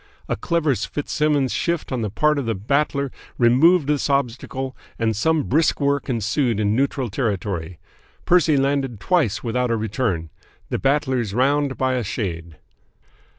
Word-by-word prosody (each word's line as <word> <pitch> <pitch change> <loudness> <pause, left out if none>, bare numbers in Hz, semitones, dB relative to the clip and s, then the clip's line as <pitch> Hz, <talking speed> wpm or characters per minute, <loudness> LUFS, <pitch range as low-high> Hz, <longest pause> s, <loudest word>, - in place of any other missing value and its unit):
A - - -1
clever 165 -5 0
Fitzsimmons' 145 +3 -1
shift 170 -3 -1
on 125 -2 -1
the 105 - -1
part 150 +8 +1
of 130 - -4
the 115 - 0
Battler 140 +6 0 0.3
removed 140 +8 +5
this 145 0 0
obstacle, 130 0 -2 0.2
and 110 -1 0
some 160 +8 +1
brisk 155 +5 +2
work 140 -1 0
ensued 115 0 0
in 105 0 +1
neutral 135 -2 0
territory. 95 -7 -2 0.5
Percy 170 -4 +4
landed 135 -4 0
twice 155 - +1
without 125 +1 0
a 115 - +1
return. 105 - -2 0.4
The - - -1
Battler's 130 -7 0
round 140 +2 +1
by 130 -1 +1
a 125 -2 -1
shade. 85 -6 -4
130 Hz, 150 wpm, -22 LUFS, 110-145 Hz, 0.5 s, removed